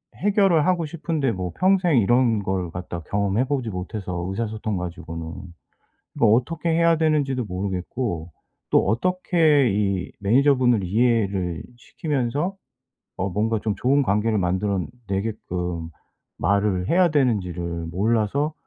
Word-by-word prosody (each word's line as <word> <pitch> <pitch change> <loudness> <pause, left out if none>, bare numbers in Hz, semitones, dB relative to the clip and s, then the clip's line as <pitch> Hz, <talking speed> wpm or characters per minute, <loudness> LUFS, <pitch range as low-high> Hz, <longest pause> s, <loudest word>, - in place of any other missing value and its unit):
해결을 195 -6 +3
하고 175 -3 +1
싶은데 155 -4 -2
뭐 90 -2 -4
평생 185 -5 +3
이런 115 -1 +2
걸 95 -3 -2
갖다가 85 -1 -6
경험해 100 +3 +1
보지 130 -4 -2
못해서 90 -2 -4
의사소통 110 0 -3
가지고는. 85 -2 -6 0.8
이거 115 - +3
어떻게 130 +10 +1
해야 165 0 +3
되는지도 145 -5 +1
모르겠고 90 -1 -3 0.4
또 - - +4
어떻게 155 - +2
이 100 -2 -1
매니저분을 125 0 +3
이해를 100 -4 0
시키면서 145 +6 -2 0.6
어 95 +1 -1
뭔가 110 +3 0
좀 105 -2 -2
좋은 140 +3 +2
관계를 105 0 +1
만들어 95 +2 0 0.3
내게끔 90 -5 -3 0.5
말을 100 -2 +1
해야 180 0 +4
되는지를 90 - -1
몰라서 115 - 0
110 Hz, 295 characters per minute, -23 LUFS, 95-140 Hz, 0.8 s, 또